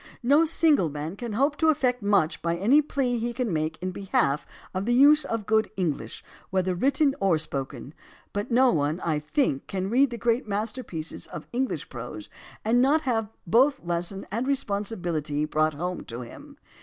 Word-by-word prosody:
No 285 +6 +5
single 310 - +3
man 150 +4 -5
can 235 0 -5
hope 280 +6 +1
to 320 +1 +3
effect 250 -5 +1
much 200 -6 +2
by 170 0 0
any 240 - +5
plea 260 -5 -1
he 240 +1 -2
can 240 -5 -2
make 155 0 -1
in 185 - -1
behalf 180 -7 0 0.3
of 190 +3 -3
the 240 - +3
use 290 +3 +6
of 225 -2 -3
good 220 +1 +2
English, 170 -7 -3 0.3
whether 185 -1 0
written 275 - +2
or 190 -4 +3
spoken. 140 -3 -4 0.4
But 205 0 -3
no 250 +1 +5
one, 150 +2 0
I 155 -3 0
think, 150 - -1
can 190 +1 -3
read 270 +3 +4
the 235 - -5
great 235 0 0
masterpieces 210 -6 -4
of - - -8
English 250 - -2
prose 120 -4 -8 0.3
and 235 +3 +3
not 290 +4 +4
have 225 -6 -1 0.2
both 260 - +3
lesson 175 +3 -2
and 235 +5 -2
responsibility 190 - -1
brought 155 0 +1
home 180 +4 -4
to 120 +1 -7
him. 285 - -11
205 Hz, 180 wpm, -26 LUFS, 160-255 Hz, 0.4 s, use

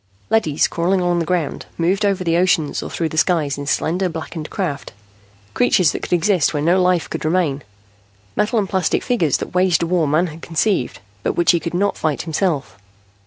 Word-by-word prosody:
Leadys, 160 -10 +2
crawling 180 +3 0
along 175 -1 +1
the 165 - -1
ground, 175 -5 -2
moving 195 +5 +1
over 190 -2 -1
the 165 -1 +1
oceans 170 -4 +1
or - - -6
through 165 - -2
the 155 - 0
skies 155 -6 +1
in 145 0 -7
slender, 180 +5 0
blackened 160 -1 -6
craft, 175 - -4 0.6
creatures 185 - +3
that - - -5
could - - -7
exist 175 -3 +2
where 145 - -1
no 175 +4 +3
life 180 -2 +2
could - - -5
remain, 155 -4 0 0.7
metal 215 +3 +1
and 205 -3 +1
plastic 190 0 0
figures 200 - +1
that - - -7
waged 180 -1 +2
a - - +1
war 170 -2 +1
Man 155 +5 +2
had 165 -1 -8
conceived, 160 - -1 0.2
but - - -1
which 175 - +3
he 170 - +1
could 170 +2 -5
not 200 +3 0
fight 155 -3 -1
himself. 160 - -2
170 Hz, 200 wpm, -19 LUFS, 155-185 Hz, 0.7 s, creatures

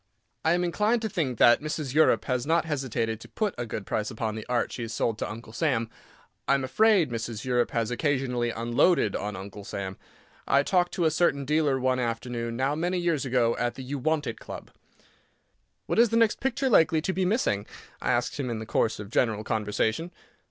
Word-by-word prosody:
I 160 - +3
am 175 0 +1
inclined 210 +6 +1
to 220 - -1
think 150 - -2
that 120 +4 +6
Mrs. 150 -3 -3
Europe 155 +2 +4
has 125 -1 -1
not 165 0 +2
hesitated 120 -7 -2
to - - -13
put 215 -3 -1
a 120 -1 -4
good 105 -2 -5
price 105 +2 -2
upon 110 0 -3
the 110 0 -7
art 125 -1 0
she - - -6
has 115 -1 -4
sold 115 -1 -1
to - - -2
Uncle 110 +1 -9
Sam. 115 -5 0 0.6
I 140 - +4
am 135 - -1
afraid 190 - +3
Mrs. 115 -1 -4
Europe 125 -1 +1
has 115 -1 -1
occasionally 125 -3 0
"unloaded" 120 - +2
on 105 0 -3
Uncle 100 +2 -8
Sam. 95 -1 -5 0.5
I 140 - +4
talked 180 +2 +2
to 175 - 0
a 160 - +4
certain 145 -4 +1
dealer 150 -2 +2
one 130 0 +1
afternoon, 115 -1 -3
now 135 +3 +1
many 175 +4 -1
years 170 -5 0
ago, 120 -3 +2
at 120 0 -1
the 130 - -7
Uwantit 150 +2 -1
Club. - - -9 1.1
"What - - 0
is 235 -1 +6
the 230 - +1
next 230 -2 +3
picture 270 +1 0
likely 160 -8 +4
to 190 - -1
be 190 +1 0
missing?" 180 - 0 0.3
I - - -1
asked 120 +3 -1
him 130 -3 -2
in 115 - -2
the 110 - -6
course 110 0 0
of 105 0 -8
general 110 -4 +1
conversation. 110 +9 -1
130 Hz, 205 wpm, -27 LUFS, 115-160 Hz, 1.1 s, that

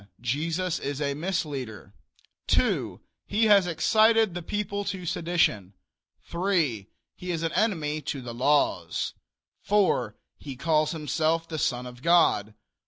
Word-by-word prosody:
Jesus 160 +8 -1
is 140 0 -4
a 140 -1 -1
misleader. 140 - -4 0.5
2. - - +1 0.3
He 220 +2 +2
has 200 -4 +5
excited 220 +4 +3
the 175 - -4
people 205 +2 -3
to 190 -3 -4
sedition. 165 - 0 0.5
3. 170 - -1 0.3
He 180 - -9
is 165 -1 -3
an 165 - 0
enemy 160 -8 0
to 140 - -4
the 120 -2 -7
laws. 140 +5 +1 0.5
4. 205 -2 +1 0.2
He 140 -3 -8
calls 155 +2 +1
himself 160 +1 -1
the 160 -2 -4
son 125 -2 -1
of 125 0 -10
God. 130 - +3
160 Hz, 130 wpm, -26 LUFS, 140-185 Hz, 0.5 s, has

